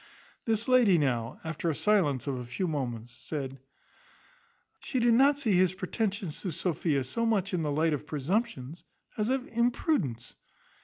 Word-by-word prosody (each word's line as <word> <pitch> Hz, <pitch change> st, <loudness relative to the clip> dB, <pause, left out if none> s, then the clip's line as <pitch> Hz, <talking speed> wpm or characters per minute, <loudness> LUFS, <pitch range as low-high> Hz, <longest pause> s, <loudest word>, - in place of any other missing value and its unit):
The 225 Hz, 0 st, +1 dB
lady 245 Hz, -8 st, +5 dB
now, 125 Hz, -5 st, -1 dB
after 160 Hz, +1 st, -2 dB
silence 155 Hz, -, +2 dB
of 135 Hz, -3 st, -2 dB
a -, -, -5 dB
few 125 Hz, +10 st, -3 dB
moments, 120 Hz, -6 st, -3 dB
said, 135 Hz, +2 st, -6 dB, 1.2 s
"She 265 Hz, -, -4 dB
did 240 Hz, -1 st, +4 dB
not 275 Hz, +4 st, +5 dB
see 240 Hz, -8 st, +1 dB
his 185 Hz, 0 st, +3 dB
pretensions 195 Hz, -3 st, -3 dB
to 185 Hz, -, -3 dB
Sophia 155 Hz, -4 st, 0 dB
so 180 Hz, -, -2 dB
much 205 Hz, -4 st, +1 dB
in 175 Hz, -, 0 dB
the 150 Hz, -2 st, -1 dB
light 155 Hz, +2 st, +2 dB
of 150 Hz, +1 st, -4 dB
presumption, 150 Hz, -, -2 dB, 0.4 s
as 215 Hz, +1 st, -1 dB
of 265 Hz, 0 st, 0 dB
imprudence. 235 Hz, -, 0 dB
175 Hz, 155 wpm, -29 LUFS, 140-225 Hz, 1.2 s, lady